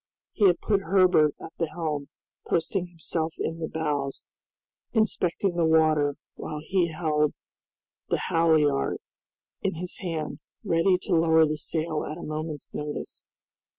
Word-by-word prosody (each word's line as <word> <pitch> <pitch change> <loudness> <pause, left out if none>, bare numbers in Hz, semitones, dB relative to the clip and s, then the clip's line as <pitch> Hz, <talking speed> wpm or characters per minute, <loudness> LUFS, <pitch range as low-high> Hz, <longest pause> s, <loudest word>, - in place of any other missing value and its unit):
He 205 - +4
had 180 - +3
put 200 -2 +2
Herbert 180 -5 +4
at 160 - -9
the 165 -2 0
helm, 155 -3 -3 0.4
posting 175 +2 0
himself 165 -1 -3
in 165 - -3
the 160 - -2
bows, 145 -4 -2 0.7
inspecting 195 -4 +1
the 170 - +2
water, 155 -3 +3 0.2
while 155 -1 -6
he 175 +3 +1
held 155 -2 0 0.7
the - - +2
halliard 155 -4 +2 0.6
in 195 - -1
his 180 +2 -5
hand, 160 -5 -3 0.2
ready 170 +3 +3
to 190 - -1
lower 160 -1 +5
the 155 0 -1
sail 155 0 -2
at 155 - -5
a 175 - -8
moment's 155 -1 -5
notice. 150 0 -6
160 Hz, 140 wpm, -27 LUFS, 150-175 Hz, 0.7 s, lower